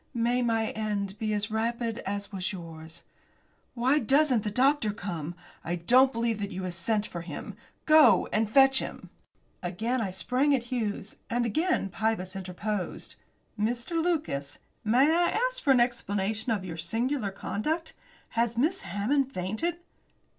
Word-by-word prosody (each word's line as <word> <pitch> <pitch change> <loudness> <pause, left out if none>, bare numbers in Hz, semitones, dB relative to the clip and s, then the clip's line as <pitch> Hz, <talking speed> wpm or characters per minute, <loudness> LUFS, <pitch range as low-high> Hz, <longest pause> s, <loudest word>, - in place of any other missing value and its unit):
May 240 +2 +2
my 225 -2 +1
end 205 -2 -2
be 215 -2 -1
as 210 +1 -2
rapid 230 +1 -1
as 200 +1 -3
was 185 -2 -2
yours. 165 -2 -9 0.7
Why 260 +5 +3
doesn't 270 -1 +3
the 210 - -2
doctor 255 +1 +3
come? 175 -5 -5 0.3
I 175 - -2
don't 250 +10 +5
believe 230 -2 -1
that 200 -1 -3
you 190 -1 -5
have 180 -1 -3
sent 205 +4 0
for 170 - -6
him. 170 +4 -7 0.3
Go 300 - +6
and 215 0 +1
fetch 270 +3 +6
him." - - -7 0.5
Again 220 +8 -1
I 200 - -1
sprang 250 - +2
at 245 - -2
Hughes. 210 -4 -3
And 240 +1 +1
again 315 - 0
Pybus 195 -2 -2
interposed. 190 +1 -4 0.5
"Mr. 235 +6 -1
Lucas, 300 - -1 0.3
may 235 +5 +4
I 345 +6 +2
ask - - -8
for 285 - -2
an 265 -2 +6
explanation 220 -2 0
of 200 -4 -1
your 165 -3 -6
singular 225 - -1
conduct? 310 - -3 0.4
Has 235 0 0
Miss 320 +10 +2
Hammond 235 +9 0
fainted?" 220 - -2
220 Hz, 155 wpm, -28 LUFS, 195-255 Hz, 0.7 s, Go